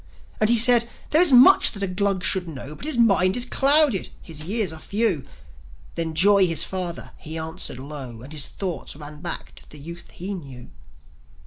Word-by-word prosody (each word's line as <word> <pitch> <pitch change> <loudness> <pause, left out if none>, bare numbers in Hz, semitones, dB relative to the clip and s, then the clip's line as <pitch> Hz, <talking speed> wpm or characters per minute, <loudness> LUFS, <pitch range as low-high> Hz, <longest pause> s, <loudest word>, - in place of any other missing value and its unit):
And 215 - +2
he 235 - +4
said, 235 0 +5 0.2
"There 310 - +4
is 355 -5 +5
much 255 +1 +7
that 200 -2 -6
a - - 0
Glug 190 0 -1
should 175 +1 0
know; 140 -1 -8
But 215 - -10
his 305 -5 0
mind 195 -4 +3
is 245 - +3
clouded, 275 - +2
his 160 -3 -10
years 195 +1 -1
are 160 - -9
few." 200 - -1 0.7
Then 165 -1 -4
joi, 195 +2 +5
the 165 - -2
father, 180 0 -4
he 160 0 -8
answered 160 -3 -5
low 130 -4 -9
As 135 - -12
his 150 -2 -2
thoughts 185 -6 -6
ran 150 0 -11
back 175 - -6
to - - -10
the 150 - -12
youth 170 +4 -11
he 190 +4 -5
knew. 135 -9 -10
180 Hz, 195 wpm, -22 LUFS, 155-215 Hz, 0.7 s, much